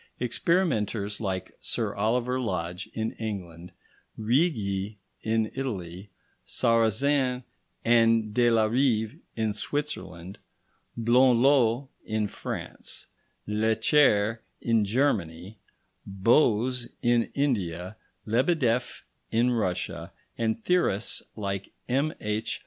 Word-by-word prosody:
Experimenters 115 - 0
like 95 -3 -3
Sir - - -2
Oliver 120 +5 0
Lodge 90 -5 -3
in 110 0 -1
England, 90 -5 -6 0.5
Righi 110 - 0 0.2
in 110 0 0
Italy, 100 -8 -5 0.3
Sarrazin 125 +3 +2 0.4
and 115 -2 +4
de 120 +1 +4
la 115 -2 +4
Rive 110 -2 +1 0.2
in 110 -2 0
Switzerland, 100 - -4 0.6
Blondlot 125 +1 +4
in 110 -1 -1
France, - - -6 0.4
Lecher 110 +1 +3 0.2
in 115 -3 +2
Germany, 100 - -1 0.5
Bose 120 +4 +2 0.2
in 120 -1 +3
India, 95 - -1 0.3
Lebedeff 125 0 +1 0.3
in 120 +2 +2
Russia, 95 -6 -2 0.2
and 115 -1 -1
theorists 175 - +1
like 100 -2 -4
M.H. 115 -5 -1
110 Hz, 85 wpm, -27 LUFS, 100-125 Hz, 0.6 s, and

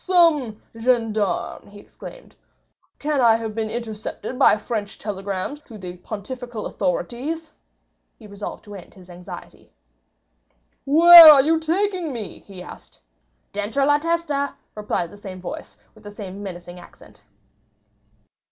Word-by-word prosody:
"Some 315 - +3 0.2
gendarme!" 225 -4 -1
he 205 0 -14
exclaimed. - - -13 0.6
"Can 295 -2 -1
I 230 -2 +5
have 225 -1 -4
been 220 0 -3
intercepted 225 +1 -6
by 265 - +5
French 210 -1 -5
telegrams 200 +5 -5
to 225 - -11
the 180 -2 -8
pontifical 230 +4 -7
authorities?" 280 - -3 0.7
He 220 - -15
resolved 200 0 -8
to 205 - -12
end 195 -3 -12
his 185 -2 -15
anxiety. 175 +1 -12 1.2
"Where 335 +2 +11
are 275 -3 +6
you 320 +2 +2
taking 355 0 -1
me?" 225 -6 -7
he 190 -3 -12
asked. - - -13 0.5
"Dentro 215 +7 -1
la 290 +1 +3
testa," 320 -3 -1 0.2
replied 210 -5 -3
the 205 - -13
same 190 -2 -9
voice, 180 - -8 0.2
with - - -20
the 205 - -9
same 200 -1 -9
menacing 175 -2 -8
accent. 175 - -17
225 Hz, 135 wpm, -22 LUFS, 200-290 Hz, 1.2 s, Where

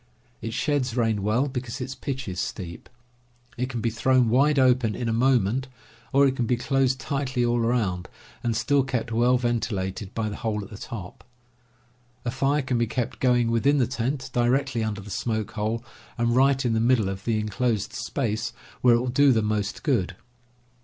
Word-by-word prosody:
It 115 - -4
sheds 135 -5 0
rain 115 -3 +1
well, 110 +7 +1
because 125 -1 -5
its 130 +1 -4
pitch 130 -1 -5
is 90 -1 -4
steep. 85 -3 -5 0.7
It 125 +1 -2
can 120 -3 -4
be 115 - 0
thrown 120 +1 +3
wide 140 +5 +3
open 125 -4 +3
in 120 - -3
a 115 - 0
moment, 125 0 +2 0.4
or 140 +1 +5
it 135 -1 +2
can 120 -3 -1
be 125 - +2
closed 130 +1 +1
tightly 135 -4 -1
all 120 0 +1
around 110 -7 0 0.3
and 115 -2 0
still 140 +4 +3
kept 125 -4 -2
well 120 +3 +3
ventilated 105 -5 -2
by 115 -1 -1
the 105 - -5
hole 105 -2 -2
at 100 - -12
the 105 - -8
top. 95 -6 -8 1.0
A 120 - 0
fire 135 +3 +1
can 125 -2 0
be 115 - +1
kept 120 0 -3
going 120 -2 +3
within 135 +6 +3
the 130 - +3
tent, 125 +3 -3
directly 125 0 +1
under 105 -2 -3
the 105 +1 -10
smoke 110 -1 -2
hole, 110 +2 -2 0.3
and 120 0 +1
right 135 0 +3
in 120 - +2
the 110 - +2
middle 115 -3 +3
of 95 0 -4
the 115 -1 0
inclosed 110 0 -1
space, 115 -2 -2 0.3
where 120 -2 +6
it - - +3
will 125 - -2
do 140 +2 +5
the 110 -3 +2
most 105 -1 -2
good. 100 - +1
120 Hz, 195 wpm, -25 LUFS, 110-130 Hz, 1.0 s, where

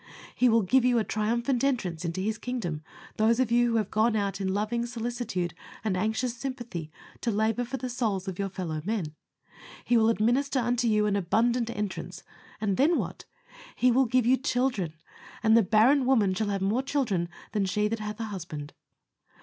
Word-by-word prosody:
He 250 - +3
will 225 -1 +4
give 255 +7 +3
you 245 -1 +3
a 225 - +2
triumphant 235 +5 0
entrance 190 -12 -1
into 170 +2 -2
His 215 +2 -2
kingdom, 220 -12 -3 0.4
those 225 +2 +3
of 255 -3 +1
you 240 0 +4
who 230 - 0
have 210 -3 -1
gone 220 +1 +2
out 200 -1 -1
in 190 -1 0
loving 215 +4 -1
solicitude 230 -7 -3 0.3
and 210 -4 0
anxious 220 +5 -1
sympathy 240 - -6 0.3
to 235 - -1
labor 220 +2 +1
for 245 +3 -4
the 255 - -4
souls 220 -6 -2
of 190 -1 -5
your 195 0 -1
fellow 170 -5 -4
men. 190 -6 -2 0.7
He 240 - +3
will 225 0 +4
administer 245 +6 +1
unto 245 0 +1
you 210 -1 +3
an 205 -1 +1
abundant 235 +5 +1
entrance, 210 -4 -5 0.4
and 205 -3 0
then 315 +6 +4
what? - - -4 0.5
He 250 0 +3
will 260 +2 +4
give 250 0 +2
you 255 +2 +4
CHILDREN; 245 - -1 0.5
and 220 0 +5
the 230 - +7
barren 235 +7 +4
woman 215 -8 +3
shall 205 +2 -1
have 195 -1 -1
more 215 +6 +1
children 225 -12 -1 0.2
than 205 -3 0
she 210 +3 +1
that 225 +1 -2
hath 210 0 -5
a - - -2
husband. 170 -8 -6
220 Hz, 190 wpm, -28 LUFS, 195-245 Hz, 0.7 s, the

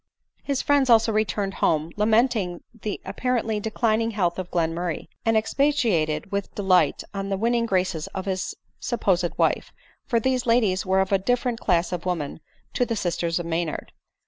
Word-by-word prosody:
His 280 -2 -1
friends 285 -3 +3
also 225 -1 +5
returned 210 -2 0
home, 160 +1 +2
lamenting 215 -4 +1
the 215 -3 -5
appa 255 - -5
rently 225 -4 +1
declining 220 +1 +1
health 185 -5 0
of 180 -1 -5
Glenmurray, 170 0 -2 0.2
and 225 -1 +4
expatiating 215 - +1
with 200 -1 -3
delight 185 -7 +3
on 195 0 -3
the 195 - 0
winning 230 +2 +1
graces 185 -4 0
of 190 -1 -6
his 190 -1 -2 0.2
supposed 185 -7 0
wife; - - +1 0.4
for 235 - +2
these 255 +1 0
ladies 215 -6 +2
were 190 0 +3
of 190 - -2
a 195 - +4
different 245 +3 0
class 175 -2 +1
of 180 0 -4
women 160 -6 -2 0.3
to - - +2
the 235 -2 -1
sisters 170 -4 -1
of 175 - -3
Maynard. 165 -2 -3
200 Hz, 170 wpm, -24 LUFS, 175-230 Hz, 0.4 s, also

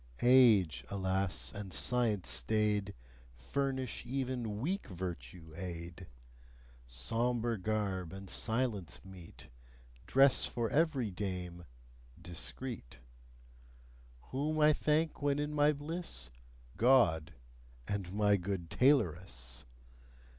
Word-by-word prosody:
Age, 110 - +6
alas! 95 -2 -1
and 100 -2 -7
science 115 -2 +1
staid, 105 - +1 0.4
Furnish 130 - -2
even 125 -5 -3
weak 185 - -2
virtue 85 -4 -7
aid. 85 0 -7 0.8
Sombre 115 - -1
garb 95 -4 -2
and 95 0 -8
silence 110 - 0
meet: 90 -8 -12 0.6
Dress 135 0 +5
for 115 -2 -2
every 145 -8 +1
dame 90 -2 -5 0.5
discreet. 85 - -6 1.3
Whom 150 +4 -1
I 150 0 +6
thank 155 +2 0
when 145 -1 +2
in 150 +1 -2
my 150 0 +4
bliss? 150 - -5 0.5
God! 90 - +4 0.5
and 100 -3 -3
my 105 0 +3
good 90 -2 -4
tailoress! 80 - +1
105 Hz, 95 wpm, -33 LUFS, 90-130 Hz, 1.3 s, Age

